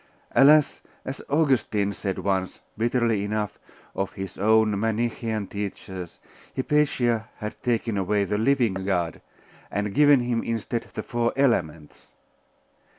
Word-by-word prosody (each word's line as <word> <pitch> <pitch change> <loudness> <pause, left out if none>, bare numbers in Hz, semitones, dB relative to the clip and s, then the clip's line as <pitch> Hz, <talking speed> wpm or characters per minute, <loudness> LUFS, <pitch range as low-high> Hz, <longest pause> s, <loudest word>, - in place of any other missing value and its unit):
Alas! 150 +2 +5 0.2
as 130 - -5
Augustine 130 -9 +1
said 95 -2 -3
once, 95 -2 -1 0.2
bitterly 115 -2 +1
enough, 105 0 -3 0.3
of 95 0 -3
his 95 -2 -6
own 110 0 +3
Manichaean 110 -1 -1
teachers, 95 -3 -6 0.4
Hypatia 130 -5 +1
had 105 0 -7
taken 115 -3 0
away 100 +2 +1
the 105 +2 -1
living 115 -6 +1
God, 90 -4 -1 0.5
and 105 0 -2
given 145 +1 +6
him 120 -1 0
instead 115 +1 -3
the - - -3
four 120 0 -1
Elements.... 85 - -1
110 Hz, 120 wpm, -25 LUFS, 100-120 Hz, 0.5 s, given